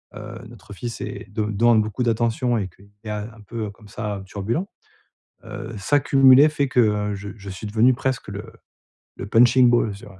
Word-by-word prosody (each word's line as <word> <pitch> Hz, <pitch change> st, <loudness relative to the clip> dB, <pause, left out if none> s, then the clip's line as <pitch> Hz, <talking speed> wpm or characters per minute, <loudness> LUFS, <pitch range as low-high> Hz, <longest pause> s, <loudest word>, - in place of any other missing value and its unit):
heu, 105 Hz, +2 st, -8 dB
notre 105 Hz, -3 st, -13 dB
fils 120 Hz, +4 st, -6 dB
est -, -, -6 dB
de 105 Hz, 0 st, -1 dB
demande 110 Hz, +2 st, +3 dB
beaucoup 110 Hz, +4 st, -3 dB
d'attention 120 Hz, +1 st, +1 dB
et 100 Hz, -3 st, -2 dB
qu'il 100 Hz, +3 st, -21 dB
est -, -, -6 dB
un 105 Hz, +1 st, -6 dB
peu, 115 Hz, -1 st, -4 dB
heu, -, -, -6 dB
comme 105 Hz, +1 st, -18 dB
ça, 105 Hz, -2 st, -4 dB
heu, 95 Hz, -, -9 dB
turbulent, 110 Hz, -, -3 dB, 0.8 s
heu, 115 Hz, 0 st, -7 dB
ça 145 Hz, +8 st, +2 dB
cumulé 135 Hz, +1 st, +6 dB
fait 145 Hz, -3 st, -1 dB
que, 125 Hz, -, +2 dB
heu, 105 Hz, -2 st, +1 dB
je 100 Hz, +1 st, -7 dB
je 100 Hz, -1 st, -9 dB
suis 95 Hz, +3 st, -7 dB
devenu 115 Hz, +5 st, +4 dB
presque 125 Hz, -3 st, -3 dB
le 100 Hz, +3 st, -7 dB, 0.7 s
le -, -, -6 dB
punching 120 Hz, +3 st, +5 dB
balls, 120 Hz, -3 st, +2 dB
tu 100 Hz, -, -13 dB
vois? 95 Hz, -2 st, -15 dB
110 Hz, 205 wpm, -22 LUFS, 105-120 Hz, 0.8 s, cumulé